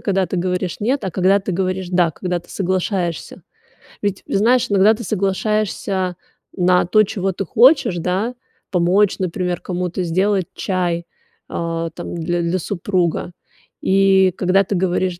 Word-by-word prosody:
когда 195 -2 +1
ты 185 - -4
говоришь 180 0 -2
"нет", 245 +1 0
а 190 - -2
когда 190 +3 +3
ты 195 -1 -4
говоришь 185 0 -2
"да", 175 -2 +3
когда 180 0 -3
ты 175 - -24
соглашаешься. 185 -2 -2 0.6
Ведь, 200 -2 -2
э, - - -5
знаешь, 240 +4 +3
иногда 205 +3 +5
ты 235 - -7
соглашаешься 195 -2 -1 0.4
на 180 -1 +3
то, 215 +5 +4
чего 195 -1 -2
ты 195 - -4
хочешь, 245 - +4
да, 190 +8 -1 0.4
помочь, 185 +3 +2
например, 180 -1 -2
кому-то 180 0 -3
сделать 185 +2 +1
чай, 175 -3 -1 0.4
а, 165 0 -3
там, 175 +1 -7
дл 165 - -4 0.2
для, 170 +2 0
супруга. 180 -1 -1 0.5
И 190 -1 +4
когда 190 +2 +3
ты 195 - -3
говоришь 180 -1 0
185 Hz, 150 wpm, -19 LUFS, 175-195 Hz, 0.6 s, иногда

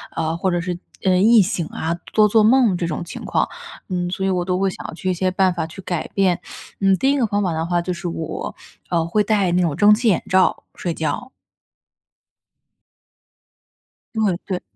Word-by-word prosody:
呃， 160 0 -1
或 190 +1 0
者 175 - 0
是 180 0 -3 0.3
呃， 185 -1 +3
易 220 +4 +6
醒 180 -3 -1
啊、 165 +1 -3 0.2
多 215 -1 +5
做 215 +1 +4
梦 235 -3 +4
这 175 - -2
种 165 +1 -3
情 170 - -8
况。 - - +1 0.4
嗯， 175 -1 -1
所 190 +1 -2
以 - - +1
我 180 -2 0
都 180 0 0
会 195 0 +2
想 - - -8
要 - - -7
去 185 +3 -3
一 - - 0
些 185 +1 0
办 185 -1 +2
法 165 -2 -3
去 165 +4 -10
改 175 -3 -3
变。 185 -3 +1 0.4
嗯， 195 -1 +4
第 270 +5 +2
一 285 - +1
个 235 - +2
方 205 0 0
法 175 -4 0
的 160 +1 -2
话， 175 0 0
就 180 +1 -3
是 175 0 -5
我， 165 -1 -5 0.3
呃， 165 -2 +1
会 210 +5 +1
戴 205 -4 +1
那 180 +1 +2
种 165 -5 0
蒸 205 +4 +6
汽 230 +3 +1
眼 195 -6 +2
罩 185 0 +3
睡 175 - -3
觉。 160 - -3 2.8
对 210 -5 +1
对。 185 -3 -3
185 Hz, 225 characters per minute, -21 LUFS, 170-205 Hz, 2.8 s, 易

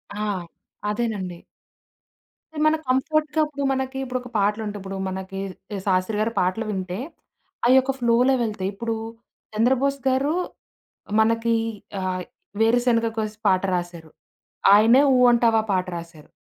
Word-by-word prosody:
ఆ! 210 +1 -2 0.6
అదేనండి. 205 -6 -3 1.1
అంటే 300 - -6
మన 310 - +4
కంఫర్ట్‌గా 300 +4 +1
ఇప్పుడు 285 -2 -5
మనకి 265 0 -2
ఇప్పుడు 255 -1 -3
ఒక 250 - -10
పాటలు 205 +2 +1
ఉంటాయి. 205 0 -5
ఇప్పుడు 195 0 -6
మనకి 190 +1 -5 0.3
కి 200 - -3
'శాస్త్రి' 185 +3 +1
గారి 225 +1 0
పాటలు 185 +5 0
వింటే 190 -1 -3 0.7
అయ్యొక 260 +1 +5
ఫ్లోలో 240 +2 +3
వెళ్తయి. 210 -4 -2
ఇప్పుడు 225 +3 -3 0.6
'చంద్రబోస్' 265 +5 +2
గారు 270 +4 +1 0.9
మనకి 230 +1 +2 0.5
ఆహ్, 185 -1 -2 0.4
'వేరుశనగ 230 0 +3
కోసి' 215 -1 -3
పాట 185 -1 +3
రాసారు. 175 -3 -5 0.7
ఆయనే 230 +6 +6
'ఊ 250 - +4
అంటావా' 230 -2 +3
పాట 185 0 +1
రాశారు. 165 -2 -11
225 Hz, 130 wpm, -23 LUFS, 190-255 Hz, 1.1 s, ఆయనే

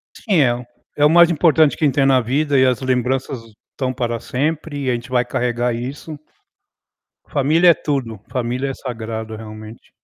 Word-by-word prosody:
Sim, 190 - +1
é 120 -3 +3
o 125 0 -8 0.3
é 145 - +4
o - - +6
mais 170 +1 +6
importante 160 -2 +3
que - - -4
a - - +6
gente 135 - -1
tem 135 -1 +3
na 135 -1 +4
vida 140 +4 +1
e 130 - +5
as 130 0 +1
lembranças 130 0 -1 0.3
estão 130 -1 -3
para 120 -2 -2
sempre 150 +4 -3
e 130 - 0
a - - +2
gente 120 +1 -5
vai 125 -1 +2
carregar 120 0 -1
isso. 140 +6 -6 1.1
Família 155 +6 +3
é - - +8
tudo. 130 -7 -3
Família 125 +2 -2
é - - -3
sagrado, 110 -3 -6
realmente. 110 +1 -11
130 Hz, 190 wpm, -19 LUFS, 120-145 Hz, 1.1 s, é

